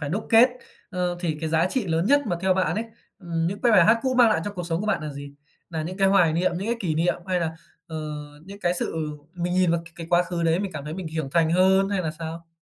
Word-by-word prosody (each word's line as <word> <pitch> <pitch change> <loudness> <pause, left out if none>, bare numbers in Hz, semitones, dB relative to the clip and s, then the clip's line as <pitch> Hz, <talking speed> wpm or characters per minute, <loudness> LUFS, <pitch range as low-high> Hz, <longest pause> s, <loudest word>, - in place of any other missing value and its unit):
phải 145 - -3
đúc 200 +7 -3
kết, 230 +3 +7 0.4
ờ, 180 -2 -1
thì 160 -4 -1
cái 160 - -2
giá 165 +2 +2
trị 250 -7 -1
lớn 165 +3 0
nhất 285 +3 +5
mà 175 - -1
theo 190 -1 +2
bạn 190 - +1
ấy, 220 +2 -2 0.3
ừm, 165 -3 -2
những 200 +3 -3
cái 240 -2 +3
bài 185 -5 +7
hát 225 +1 +5
cũ 260 -1 0
mang 245 -2 +6
lại - - +2
cho 205 - -4
cuộc 175 -3 -5
sống 165 +1 -1
của 215 - -3
bạn 195 -7 0
là 150 -1 -5
gì? 140 0 -9 0.4
Nà 160 -2 -3
những 180 +4 -5
cái 195 -1 +3
hoài 180 -5 +4
niệm, 175 +2 +1
những 200 - -4
cái 235 - 0
kỷ 165 -6 -1
niệm 170 +3 +1
hay 180 -2 0
là, 160 -1 -1 0.3
ờ, 160 - -7 0.5
những 200 +2 -11
cái 175 0 +1
sự 170 - -2 0.4
mình 175 0 -2
nhìn 180 -2 +3
vào 170 0 +1
c - - -16
cái 165 -1 -7
quá 175 0 +5
khứ 175 -1 -3
đấy 165 +2 +2
mình 195 -2 -4
cảm 145 -2 -6
thấy 155 +1 -5
mình 185 -3 -6
hiểu 155 -3 -3
thành 165 -2 +3
hơn, 190 +2 +4
hay 200 -2 -1
là 155 - -2
sao? 165 0 -7
175 Hz, 295 wpm, -24 LUFS, 165-195 Hz, 0.5 s, kết